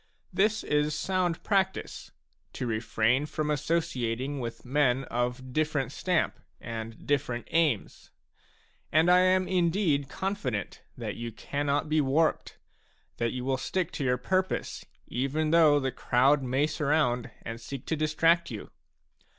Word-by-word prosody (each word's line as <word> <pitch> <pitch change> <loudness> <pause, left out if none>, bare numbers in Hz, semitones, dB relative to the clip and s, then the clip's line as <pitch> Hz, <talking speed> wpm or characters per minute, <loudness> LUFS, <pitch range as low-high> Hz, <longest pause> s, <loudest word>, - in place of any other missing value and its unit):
This 215 +4 +2
is 150 0 +1
sound 180 -1 -1
practice, 190 -2 -1 0.2
— - - -43
to - - -4
refrain 115 +4 +1
from 150 0 -2
associating 140 -4 -1
with 120 -1 -6
men 135 -1 +2
of 125 +2 -2
different 150 -4 0
stamp 180 +2 0 0.2
and 115 -1 -7
different 125 -4 -1
aims. 155 -10 0 0.8
And 160 +3 +4
I 180 - +7
am 185 0 +3
indeed 170 -6 +1
confident 150 - -3 0.2
that - - -5
you 115 0 -5
cannot 145 +5 -1
be 155 0 +2
warped, 150 +4 +1 0.6
that 115 -1 0
you 125 0 -4
will 135 0 +1
stick 180 +5 -2
to 145 - -4
your 125 -1 +2
purpose, 185 +9 -1 0.2
even 145 +5 -1
though 155 -3 +6
the 135 -1 -1
crowd 135 +5 +3
may 130 +3 +1
surround 145 -6 +1
and 115 +1 -6
seek 130 +2 -7
to 160 - -1
distract 165 +2 +2
you. 110 -5 -7
145 Hz, 140 wpm, -28 LUFS, 125-165 Hz, 0.8 s, I